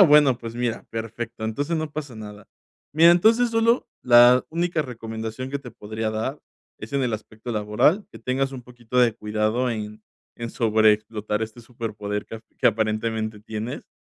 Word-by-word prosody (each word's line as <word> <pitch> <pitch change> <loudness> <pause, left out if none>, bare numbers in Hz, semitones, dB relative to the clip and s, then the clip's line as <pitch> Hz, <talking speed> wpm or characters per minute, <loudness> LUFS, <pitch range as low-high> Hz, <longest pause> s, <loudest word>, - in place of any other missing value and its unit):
ah, - - +11
bueno, 150 -7 +6
pues, 115 -1 -7
mira, 120 -1 -2
perfecto. 115 0 -5
Entonces, 145 +9 -1
no 155 -1 -3
pasa 145 -5 -6
nada. 105 -1 -10 0.5
Mira, 165 +3 +7
entonces, 225 +7 +4
solo 230 +2 +2 0.2
la 120 +1 +7
única 170 0 0
recomendación 115 0 -6
que 140 - -2
te 125 -3 -10
podría 110 0 -4
dar, 110 +7 -3 0.4
es - - -9
en 140 -1 +1
el 120 -3 0
aspecto 110 +2 -8
laboral 105 - +2
que - - -10
tengas 135 +1 -1
un 130 -2 -7
poquito 120 0 -5
de 120 -3 +4
cuidado 110 +4 0
en 105 -1 -5 0.4
en 115 -1 -4
sobreexplotar 110 -2 +2
este 110 +1 -5
superpoder 105 -4 -5
que 115 0 -8 0.2
que - - +3
aparentemente 110 0 0
tienes, 110 +5 -6
115 Hz, 165 wpm, -24 LUFS, 110-135 Hz, 0.5 s, ah